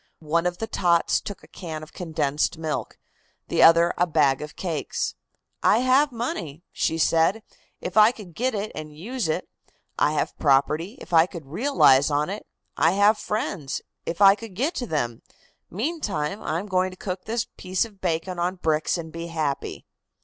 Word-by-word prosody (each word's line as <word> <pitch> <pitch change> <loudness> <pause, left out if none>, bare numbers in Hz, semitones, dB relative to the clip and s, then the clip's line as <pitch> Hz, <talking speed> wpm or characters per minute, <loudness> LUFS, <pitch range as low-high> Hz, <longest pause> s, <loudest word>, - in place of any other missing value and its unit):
One 165 +3 +1
of 175 0 -3
the 225 - -3
tots 175 -6 +2
took 205 - -8
a - - -15
can 160 -4 -7
of 155 - -13
condensed 155 -2 -1
milk, 160 -1 -4 0.5
the - - +2
other 170 +1 +7
a 175 - +3
bag 145 -5 +2
of 150 0 -7
cakes. 165 -6 -3 0.5
"I 225 - +4
have 265 +3 +4
money," 180 - -4
she 160 - 0
said, 165 +6 +2 0.4
"'if - - -5
I 215 +1 +7
could 205 -8 -12
get 250 +6 -1
it 205 +1 -3
and 155 -1 -8
use 235 +5 -3
it. 155 - -1 0.5
I 150 - +3
have 155 - -1
property, 150 - +2
if - - -11
I 165 +1 +6
could 170 -5 -9
realize 145 - +4
on 150 +4 0
it. 210 - -7 0.3
I 170 - +3
have 205 +2 +4
friends, 195 -9 -3 0.2
if 170 +4 -4
I 195 0 +9
could 210 -2 -9
get 280 - 0
to 245 - -3
them. 120 - -2 0.5
Meantime 205 - -2
I 155 - -2
am 185 - -4
going 185 -2 +1
to 185 - -12
cook 185 -1 -5
this 230 +2 -1
piece 185 +3 -1
of 205 -4 -15
bacon 175 +1 -2
on 180 +2 0
bricks 160 -2 0
and 160 -1 -7
be 165 +1 -6
happy." 155 -4 -3
175 Hz, 185 wpm, -25 LUFS, 155-210 Hz, 0.5 s, I